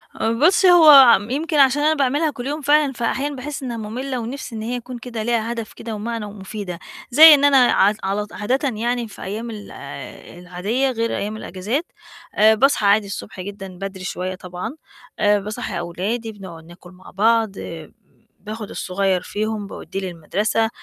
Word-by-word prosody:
آآ 225 - 0
بُصّي، 345 +9 +4
هو 295 -8 +9
يمكن 305 +4 -2
عشان 275 +1 +4
أنا 310 +1 +4
باعملها 290 +2 +1
كل 255 -2 -7
يوم 295 +2 -3
فعلًا، 290 -1 +3
فأحيانًا 265 +5 -2
باحس 275 +1 -6
إنهّا 240 -2 -4
مُمِّلة 250 +5 -4
ونِفْسي 240 +1 -6
إن 220 - -5
هي 245 +3 -3
تكون 245 +1 -9
كده 235 -2 -6
ليها 230 0 -1
هدف 230 -2 -6
كده 225 -2 -7
ومعنى 225 +1 -4
ومُفيدة، 200 -3 -7 0.3
زي 310 +5 +10
إن 285 -1 +4
أنا 280 -1 +5
عط 205 +2 +3
علط 205 +2 -3
عادةً 265 +7 -1
يعني 235 +1 -2
في 210 - -13
أيام 220 +5 -5
ال 210 -2 -9 0.7
العادية 200 +10 -2
غير 230 -1 -2
أيام 210 +2 -4
الإجازات، 220 - -3 0.5
آآ 215 +1 +5
باصحى 265 -2 +2
عادي 200 0 +4
الصبح 195 -1 -8
جدًا 195 0 -7
بدري 195 -1 -7
شوية 185 0 -4
طبعًا، 180 - -7 0.4
آآ 205 0 +3
باصّحي 210 -2 -5
أولادي 205 +7 -3
بنقعُد 185 -6 -11
ناكُل 175 +1 -15
مع 185 0 -15
بعض، 220 0 +1
آآ 160 -2 -8 0.5
باخُد 215 +1 -7
الصغير 185 -1 -1
فيهم 215 +1 -4
باودّيه 195 - -7
للمَدرسة، 195 +5 -1
220 Hz, 170 wpm, -21 LUFS, 200-260 Hz, 0.7 s, زي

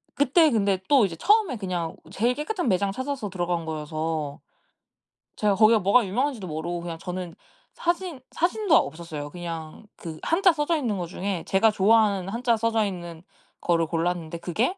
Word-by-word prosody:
그때 295 +4 +4
근데 200 -4 +1
또 270 -7 +6
이제 170 - -4
처음에 405 - +3
그냥 180 -5 -3 0.2
제일 235 +6 +1
깨끗한 350 - -2
매장 195 +1 +1
찾아서 260 -1 -4
들어간 175 -2 -2
거여서 155 -1 -3 1.0
제가 205 -2 +2
거기가 220 +1 +5
뭐가 205 +4 +4
유명한지도 235 0 -1
모르고 170 +2 -4
그냥 170 -1 -5
저는 180 -2 -6 0.4
사진 345 -5 -2
사진도 360 +1 +2
없었어요. 155 -3 -3
그냥 165 0 -7
그 160 -2 -8
한자 360 +1 +4
써져 310 +2 0
있는 235 -9 -1
거 175 -2 -3
중에 185 0 -3
제가 210 +3 +4
좋아하는 205 -2 +3
한자 235 +2 +1
써져 225 -1 +1
있는 175 -4 -6 0.4
거를 165 -1 +2
골랐는데 170 0 -2
그게 225 - -1
195 Hz, 355 characters per minute, -25 LUFS, 170-250 Hz, 1.0 s, 또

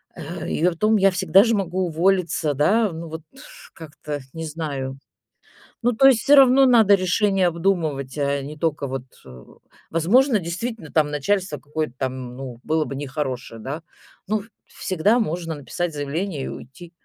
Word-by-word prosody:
Э, 165 +1 -7
и 165 - 0
притом 195 +5 +2
я 195 -2 +4
всегда 190 +1 +4
же 230 0 +2
могу 185 -2 -1
уволиться, 170 -2 +1
да. 205 - +2
Ну, 165 +1 -7
вот 160 +1 -7 0.5
как-то 150 -2 -7
не 165 0 -5
знаю. 160 +1 -7 1.2
Ну, 245 - +3
то 270 +5 +5
есть 250 -5 +5
всё 285 +3 +5
равно 270 0 +7
надо 225 -5 +6
решение 190 0 +2
обдумывать, 165 -6 -1
а 140 -1 0
не 145 +3 -8
только 150 -3 -1
вот 130 -1 -4 0.2
э 65 -2 -13 0.5
Возможно, 215 - +3
действительно 180 +1 -5
там 150 -2 +2
начальство 165 +2 -1
какое-то 150 -3 -4
там, 130 -2 -4
ну, 125 -3 -8
было 160 0 0
бы 135 - -6
нехорошее, 135 -4 -4
да. 145 +7 -5 0.4
Ну, 210 +1 -1 0.2
всегда 195 +6 0
можно 170 -5 -2
написать 165 +4 -4
заявление 150 +2 -3
и - - -5
уйти. 165 +6 -10
165 Hz, 160 wpm, -22 LUFS, 145-195 Hz, 1.2 s, равно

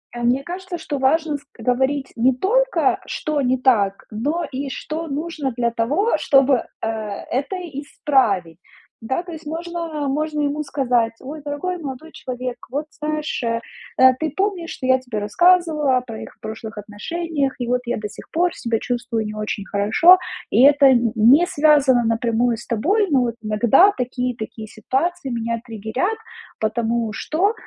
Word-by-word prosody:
э, - - -5
мне 245 +3 +2
кажется, 360 +2 -6
что 315 -3 -4
важно 300 +3 +2
ск 285 0 -21
говорить 265 +4 0
не 250 +3 +4
только - - +2
что 305 -1 -2
не 255 0 +2
так, 210 -7 +2
но 295 +11 -1
и 275 +1 -4
что 315 +4 -5
нужно 295 -2 -3
для 235 -1 0
того, 285 - +1
чтобы, 270 -2 +3 0.2
э, - - +1
это 225 - -3 0.2
исправить. 210 - 0 0.4
Да, 260 +8 -1
то 355 - -9
есть 320 -1 -10
можно 330 -2 -4
можно 300 +2 -1
ему 290 +1 -1
сказать: 250 -5 0
"Ой, 295 +3 -7
дорогой 295 +5 -3
молодой 300 0 -7
человек, 255 -4 -5
вот 290 +3 -2
знаешь, 305 -2 -3
э, 230 0 0 0.4
э, 260 0 +8
ты 315 -2 -1
помнишь, 380 -3 -1
что 255 - -5
я 260 0 +5
тебе 245 -4 -5
рассказывала 305 - +3
о - - 0
про 230 -3 -8
их - - -12
прошлых 220 0 -7
отношениях, 275 +8 -3
и 245 - -3
вот 250 +1 +1
я 240 - -1
до 210 - -4
сих - - -13
пор 350 +1 +1
себя 230 -2 -1
чувствую 235 -2 -2
не 210 0 -5
очень 210 -1 -4
хорошо. 220 - +5 0.3
И 245 - +4
это 285 0 +7
н 240 -3 +4
не 250 +10 +6
связано 285 -6 +4
напрямую 230 +1 +1
с 240 - -10
тобой. 380 - +1
Но 270 -3 +4
вот 235 -2 -1
иногда 235 - +4
такие 250 0 -1
и - - -21
такие 220 0 -7
ситуации 270 +9 -2
меня 230 -1 -2
триггерят, 230 - -2 0.4
потому 225 +1 0
что, 360 - 0
265 Hz, 170 wpm, -21 LUFS, 230-310 Hz, 0.4 s, э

